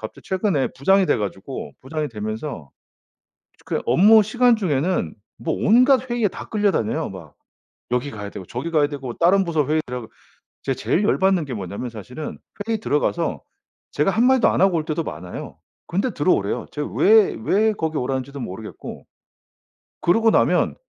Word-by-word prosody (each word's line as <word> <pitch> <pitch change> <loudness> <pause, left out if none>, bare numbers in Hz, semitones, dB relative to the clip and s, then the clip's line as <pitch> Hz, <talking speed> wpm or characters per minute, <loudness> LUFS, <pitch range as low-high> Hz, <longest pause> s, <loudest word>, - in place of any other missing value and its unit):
갑자기 110 - -9
최근에 190 -7 0
부장이 190 +8 +3
돼가지고 105 - -3
부장이 155 +2 -3
되면서 110 - -6 1.0
그 - - -1
업무 210 - +6
시간 245 +3 +3
중에는 160 - 0 0.2
뭐 160 - -2
온갖 255 +3 +4
회의에 240 -3 +1
다 - - -8
끌려다녀요. 205 - 0
막 90 -6 -11 0.6
여기 125 +3 -1
가야 105 -2 -6
되고 95 - -9
저기 130 - -5
가야 150 -2 +3
되고 135 -4 -6
다른 190 +3 +4
부서 160 -5 0
회의 155 +1 +2
들어가 125 0 -5 0.6
제가 135 - -1
제일 205 - 0
열받는게 190 -8 +2
뭐냐면 100 +3 -5
사실은 125 +7 -8 0.3
회의 225 -2 -1
들어가서 145 - -1 0.5
제가 150 +6 +1
1 230 +3 +2
마디도 260 -1 +5
안 - - +1
하고 190 -3 +4
올 155 - -4
때도 160 0 -1
많아요. 90 +4 -7 0.3
근데 195 +9 0
들어오래요. 145 - +1
제가 150 -1 -3
왜 215 0 +5
왜 215 +2 +2
거기 160 -4 -2
오라는지도 135 +2 -3
모르겠고 105 0 -8 1.0
그러고 225 +6 +3
나면 - - +2
155 Hz, 350 characters per minute, -22 LUFS, 125-195 Hz, 1.0 s, 업무